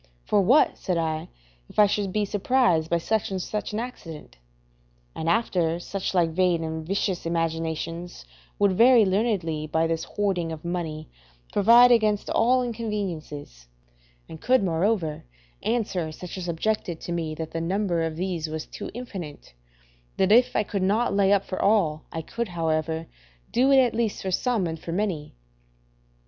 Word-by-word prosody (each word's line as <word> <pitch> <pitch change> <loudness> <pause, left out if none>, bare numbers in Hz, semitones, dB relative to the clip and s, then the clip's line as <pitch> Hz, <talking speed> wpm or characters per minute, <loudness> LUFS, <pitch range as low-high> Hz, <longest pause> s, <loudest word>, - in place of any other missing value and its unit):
For 205 - +3
what, 255 +11 +4
said 180 -2 -1
I, 160 -1 -2 0.4
if - - -16
I 210 - +8
should 200 -1 -1
be 210 +1 0
surprised 200 -6 +2
by 170 - +2
such 215 +5 -1
or 190 - -1
such 210 +4 -4
an 210 - -2
accident? 165 - -8 0.8
And 160 - -3
after 170 -5 +1
such 190 +2 -4
like 170 -2 +3
vain 175 -1 +1
and 160 0 -4
vicious 185 0 -2
imaginations, 165 - -3 0.3
would 200 -1 +3
very 235 +1 +6
learnedly, 185 -7 0
by 160 +1 +1
this 165 0 -1
hoarding 185 -5 -1
of 160 +1 -8
money, 160 -3 -4 0.5
provide 235 +4 +7
against 215 -3 +2
all 250 +2 +3
inconveniences; 185 - -5 0.6
and 160 - -10
could, 255 -3 +3
moreover, 170 -2 0 0.4
answer 195 -9 -1
such 180 +3 -8
as 185 -2 -5
objected 175 0 -2
to - - -6
me 165 -2 -2
that 160 0 -6
the 165 - -3
number 180 0 0
of 165 -1 -2
these 175 -2 -2
was 155 0 -5
too - - -8
infinite, 190 - -8 0.6
that 190 +1 +2
if 240 +3 +5
I 210 - +3
could 200 -1 -3
not 210 +4 +1
lay 200 -1 +3
up 200 -1 +4
for 185 - -4
all, 170 -8 +2
I 160 - -4
could, 235 +8 -4
however, 160 -2 -1 0.5
do 260 +3 +3
it 270 - +6
at 255 -3 +4
least 225 -2 -1
for 190 - -2
some 230 0 0
and 165 -1 -4
for 165 - -6
many. 180 - -2
180 Hz, 165 wpm, -25 LUFS, 165-210 Hz, 0.8 s, I